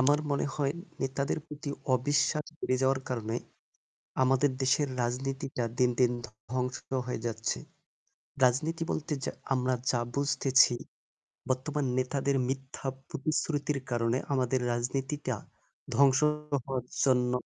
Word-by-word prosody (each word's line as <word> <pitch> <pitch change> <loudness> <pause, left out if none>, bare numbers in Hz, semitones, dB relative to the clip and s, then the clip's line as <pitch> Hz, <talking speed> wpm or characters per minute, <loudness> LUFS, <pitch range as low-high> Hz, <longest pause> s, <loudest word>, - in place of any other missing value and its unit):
আমার 145 +3 +5
মনে 140 - +1
হয় 140 -2 +1 0.3
নেতাদের 135 +2 0
প্রতি 150 -2 -6 0.2
অবিশ্বাস 145 +4 +2 0.2
বেড়ে 130 - +1
যাওয়ার 130 0 +3
কারণে 115 -2 -1 0.9
আমাদের 135 +2 +4
দেশের 140 +2 +3
রাজনীতিটা 135 +1 -2
দিনদিন 125 -1 +4 0.4
ধ্বংস 125 0 0 0.3
হয়ে 125 - -2
যাচ্ছে। 115 -1 -1 0.9
রাজনীতি 155 +7 +3
বলতে 155 0 -2
যা - - -1 0.2
আমরা 130 0 +2 0.2
যা 120 - +1 0.2
বুঝতেছি 135 -2 +4 0.7
বর্তমান 140 +3 0
নেতাদের 135 +2 +1
মিথ্যা 135 +1 -4 0.2
প্রতিশ্রুতির 145 0 0
কারণে 115 0 +2 0.2
আমাদের 130 -1 +2
রাজনীতিটা 135 +4 -1 0.6
ধ্বংস 135 -1 +6 0.5
হওয়ার 130 -3 -2 0.2
জন্য 125 -2 +4
135 Hz, 110 wpm, -30 LUFS, 125-140 Hz, 0.9 s, ধ্বংস